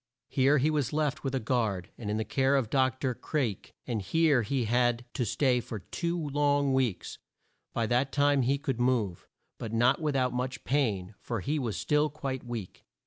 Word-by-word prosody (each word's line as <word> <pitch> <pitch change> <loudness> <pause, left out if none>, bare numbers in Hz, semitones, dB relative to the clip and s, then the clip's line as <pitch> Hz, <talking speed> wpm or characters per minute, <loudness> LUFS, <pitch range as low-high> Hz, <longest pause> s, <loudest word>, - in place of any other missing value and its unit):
Here 140 +2 +4
he 145 +4 +2
was 145 -5 0
left 155 0 0
with 135 -1 -1
a - - +1
guard, 110 -7 -1
and 105 -3 -6
in 110 +1 0
care 135 +2 +2
of 130 -6 0
Doc 130 -1 +2
tor 130 -2 0
Craik, 120 - -3
and 115 -4 -2
here 150 - +3
he 125 +2 -1
had 120 +1 +1
to 125 - -1
stay 125 +2 +2
for 115 -2 -6
two 170 - -3
long 145 -1 +2
weeks. 130 -8 -1 0.5
By 115 - 0
that 125 +4 +1
time 145 -1 +3
he 135 +3 +2
could 135 -3 -3
move, 120 -8 0 0.3
but 110 - -5
not 120 +6 +3
with 150 -3 0
out 125 -2 +1
much 125 +1 -3
pain, 110 -9 0
for 115 -4 -4
he 150 +9 -1
was 115 -6 -2
still 150 +1 +2
quite 135 -3 -4
weak. 120 -6 -7
130 Hz, 195 wpm, -29 LUFS, 115-140 Hz, 0.5 s, Here